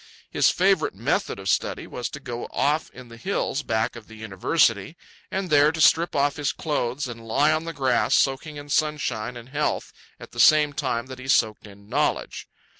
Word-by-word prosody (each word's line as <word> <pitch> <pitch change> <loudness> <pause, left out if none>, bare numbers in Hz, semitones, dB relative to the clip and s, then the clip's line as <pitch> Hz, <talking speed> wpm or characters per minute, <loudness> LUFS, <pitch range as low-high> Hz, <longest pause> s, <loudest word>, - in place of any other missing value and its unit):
His - - +4
favourite - - +2
method - - -1
of 95 0 -8
study - - 0
was 125 - -5
to 145 - -8
go 120 -4 -6
off 150 +3 0
in 125 -2 -13
the 115 - -12
hills 170 -2 -2
back 110 -2 -1
of 115 -2 -11
the 110 - -13
University, 110 - 0 0.3
and 190 -3 -3
there 145 0 +5
to 160 - -6
strip 165 +2 +4
off 145 +1 +1
his 145 -2 0
clothes 140 -3 -2
and 115 -1 -9
lie 140 +7 +3
on 155 +1 -1
the 165 - -4
grass, 130 -5 +2
soaking 140 +3 0
in 145 0 -9
sunshine 130 -6 -1
and 120 +1 -11
health 150 +2 -2 0.3
at - - -12
the - - -9
same 150 -1 +5
time 130 -5 -2
that 130 0 -10
he 130 - -9
soaked 110 -5 +1
in 100 0 -16
knowledge. 145 +6 -1
135 Hz, 195 wpm, -24 LUFS, 115-150 Hz, 0.3 s, there